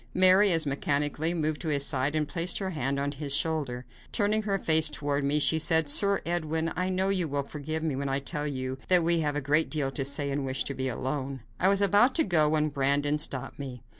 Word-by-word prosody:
Mary, 185 +2 +6
as 165 -2 +3
mechanically, 145 +3 -1
moved 155 -3 -2
to 165 - -5
his 140 -2 +2
side 140 +1 +1
and 150 -1 0
placed 170 +3 -2
her 190 -2 -3
hand 140 -3 -2
on 140 +1 -2
his 140 -1 -3
shoulder. 145 -6 -2 0.3
Turning 215 0 +1
her 200 -2 -1
face 160 -3 +4
toward 145 -1 -2
me, 140 +2 +1
she 150 +2 +2
said: 160 -1 +3
"Sir 200 +7 +3
Edwin, 160 -1 -2
I 180 +2 -1
know 190 +1 0
you 185 -4 0
will 140 -1 -2
forgive 155 +3 -5
me 155 -4 -1
when 140 +1 -3
I 135 - 0
tell 145 +2 -4
you 130 -2 -4
that 180 -2 +4
we 170 0 +2
have 150 -2 -1
a 145 - -1
great 150 +4 +1
deal 145 -4 -2
to 135 +1 -2
say 140 +1 -2
and 140 0 -2
wish 130 0 0
to 140 - -3
be 130 0 -3
alone." 135 +1 -4 0.2
I 185 - +3
was 200 0 +2
about 205 +6 +3
to 320 - +3
go 155 -5 +2
when 155 0 +1
Brandon 145 +1 0
stopped 135 -2 -3
me. 130 -4 -8
150 Hz, 235 wpm, -27 LUFS, 140-165 Hz, 0.3 s, Mary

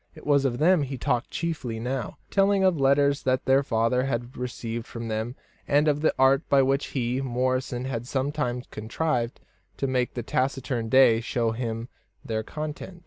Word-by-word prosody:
It - - -13
was 140 -1 +3
of 120 -3 0
them 175 +3 +4
he 135 -1 -3
talked 125 -1 -1
chiefly 145 -9 -3
now, 125 0 -3
telling 195 0 +3
of 185 -5 +3
letters 140 +1 +3
that 130 0 0
their 135 +1 +4
father 125 0 +1
had 120 -1 -3
received 115 -2 -5
from 115 -1 -6
them, 110 +3 -3 0.3
and 145 +2 +3
of 150 -1 +2
the 160 - +3
art 135 +1 +5
by 140 -1 +5
which 135 +1 +1
he, 125 0 -1
Morrison, 130 0 -1
had 120 -2 -4
sometimes 130 -2 -2
contrived 120 +2 -2 0.4
to - - -1
make 130 -2 0
the 120 - -3
taciturn 130 -2 -1
Day 125 -3 +6
show 115 -1 0
him 115 0 -4 0.4
their 110 -1 -1
contents. 155 +8 -6
130 Hz, 175 wpm, -26 LUFS, 120-140 Hz, 0.4 s, Day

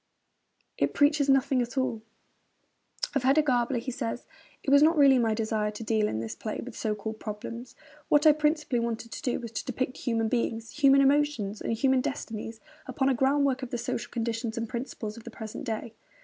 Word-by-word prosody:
It - - +1
preaches 285 -1 +3
nothing 270 -1 +3
at 240 +3 -5
all.' 260 -4 0 1.1
Of 280 - +1
Hedda 275 +4 +4
Gabler 245 -2 +1
he 240 +2 -3
says: 240 -1 -4 0.4
'It 275 - -1
was 285 0 +7
not 320 +2 +5
really 275 -3 +6
my 225 -2 +2
desire 215 -1 -1
to 210 +2 -7
deal 215 -1 +1
in 110 - -2
this 115 - -5
play 215 - -5
with 250 -3 -9
so 215 -2 -1
called 220 +1 -6
problems. 230 +3 -7 0.3
What 295 +1 +4
I 310 - +10
principally 300 -3 +1
wanted 230 0 -3
to - - -6
do 250 - -1
was 235 -3 -7
to 230 - -4
depict 255 0 -3
human 225 -2 0
beings, 225 -1 -2
human 275 -2 +5
emotions, 275 -7 +1
and - - -1
human 260 +3 +2
destinies, 225 -4 -5 0.3
upon 270 -1 0
a - - +3
groundwork 270 +1 +2
of 255 - -5
the 245 - -3
social 235 -1 -3
conditions 230 -1 -3
and 230 0 -2
principles 235 -3 -5
of 230 - -10
the 235 - -8
present 220 +3 -7
day.' 225 -1 -4
240 Hz, 200 wpm, -28 LUFS, 225-270 Hz, 1.1 s, I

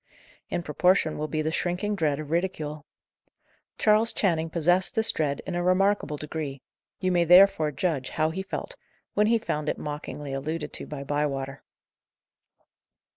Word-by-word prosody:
In 175 - -2
proportion 170 +1 +2
will 155 - -3
be 155 0 -1
the 155 - -1
shrinking 180 +5 -1
dread 150 -6 0
of 155 -1 -7
ridicule. 155 -4 -2 0.9
Charles 215 +1 +4
Channing 165 -5 0
possessed 175 +5 +2
this 220 0 +1
dread 145 -3 -1
in 185 - -4
a 175 - 0
remarkable 185 -3 +2
degree; 150 -3 -5 0.4
you 185 -1 0
may 175 -1 +3
therefore 175 -3 +6
judge 140 -3 -1
how 155 0 0
he 190 +4 -3
felt, 345 - -5 0.4
when 210 +1 +3
he 230 +1 +4
found 150 -9 -2
it - - -1
mockingly 145 -1 -6
alluded 155 +4 -4
to - - -5
by 145 -2 -6
Bywater. 140 -1 -2
160 Hz, 155 wpm, -26 LUFS, 150-185 Hz, 0.9 s, therefore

